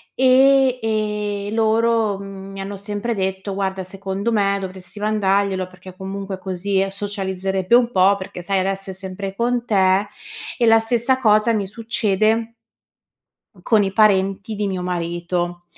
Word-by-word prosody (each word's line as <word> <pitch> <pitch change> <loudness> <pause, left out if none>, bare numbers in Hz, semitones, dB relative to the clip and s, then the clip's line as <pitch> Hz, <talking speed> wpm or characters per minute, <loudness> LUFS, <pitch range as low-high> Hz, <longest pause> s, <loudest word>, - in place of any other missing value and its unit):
e 265 0 +5
e 210 -2 -2
loro, 225 -2 +2
mhmm, 195 0 -9
mi 195 - -8
hanno 195 +1 -5
sempre 205 +4 -3
detto: 190 0 -3
"Guarda, 190 -1 -2
secondo 195 +3 -4
me 200 -2 +2
dovresti 185 +1 -9
mandarglielo, 200 -3 +1
perché 185 0 -13
comunque 195 0 -6
così 190 +1 -1
socializzerebbe 195 0 -1
un 245 -1 +3
po', 190 0 +4
perché 185 -2 -8
sai, 195 +1 0
adesso 195 +1 -2
è - - -5
sempre 190 +1 -6
con 240 +1 0
te." 195 -1 +3 0.5
E 240 - +2
la 225 0 +6
stessa 240 +3 +1
cosa 215 0 +4
mi 200 -3 -1
succede 220 +1 0 1.1
con 215 -3 +3
i 195 - -1
parenti 195 0 +2
di 205 0 -1
mio 185 -2 -3
marito. 175 0 -3
200 Hz, 145 wpm, -21 LUFS, 190-220 Hz, 1.1 s, la